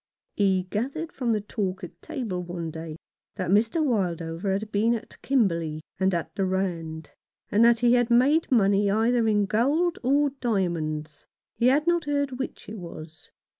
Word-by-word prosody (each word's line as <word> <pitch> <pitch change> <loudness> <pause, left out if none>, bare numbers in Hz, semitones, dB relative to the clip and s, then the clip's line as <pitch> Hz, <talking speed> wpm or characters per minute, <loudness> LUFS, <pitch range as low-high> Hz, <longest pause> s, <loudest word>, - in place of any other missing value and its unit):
He 190 -2 +2
gathered 280 +10 -3
from 245 -7 -1
the 215 -2 +1
talk 195 -2 -3
at 180 - -10
table 220 - -4
one 170 -2 -5
day 160 -1 -7 0.4
that 185 -2 -2
Mr. 225 - +3
Wildover 175 - -1
had 210 +2 -3
been 225 +3 +2
at 230 - -9
Kimberley 170 - 0 0.2
and 190 0 +2
at 170 - -3
the 195 - -1
Rand, 170 -5 -3 0.4
and 215 +3 +4
that 235 0 +5
he 240 0 +5
had 245 -1 +3
made 270 +7 +3
money 200 -3 +3
either 225 +3 +2
in 205 -2 +3
gold 285 - +1
or 280 +3 +2
diamonds. 160 - -2 0.3
He 240 - +1
had 285 +4 +3
not 345 -2 +2
heard 285 -3 -1
which 265 - -6
it 215 0 -7
was. 160 -2 -10
210 Hz, 170 wpm, -26 LUFS, 180-245 Hz, 0.4 s, that